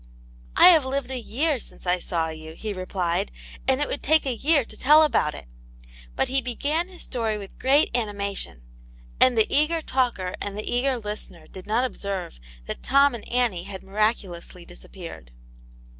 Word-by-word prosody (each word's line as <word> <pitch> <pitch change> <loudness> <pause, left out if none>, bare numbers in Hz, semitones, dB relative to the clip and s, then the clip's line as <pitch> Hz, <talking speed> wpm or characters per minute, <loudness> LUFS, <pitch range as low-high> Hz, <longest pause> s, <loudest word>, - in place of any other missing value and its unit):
" - - -24
I - - +9
have 325 -5 +6
lived 265 0 -3
a 260 - -3
year 275 +5 0
since - - -8
I 180 0 +2
saw 165 -2 -2
you," 160 0 -8
he 215 +2 -4
replied, 185 0 -2 0.2
" - - -17
and 265 0 +3
it 290 - +1
would - - -4
take 315 +1 +3
a 265 - 0
year 285 +1 +2
to - - -9
tell 300 +4 +6
about 230 - +1
it." 70 - -10 0.7
But - - +1
he 270 +1 +1
began 290 +8 -1
his 370 -2 -9
story 225 -4 -2
with 200 -2 -10
great 275 0 +3
animation, 200 - -2 0.6
and 255 -2 +5
the 220 - +5
eager 305 +3 +2
talker 240 -10 0
and 205 0 -4
the 210 - -5
eager 255 +2 +1
listener 210 -7 -7
did 185 - -11
not 230 +4 +2
observe 195 - -5 0.3
that - - -5
Tom 280 +1 +4
and 235 - -8
Annie 235 -8 0
had 195 -1 -8
miraculously 195 -4 -2
disappeared. 175 - -10
220 Hz, 185 wpm, -25 LUFS, 185-270 Hz, 0.7 s, I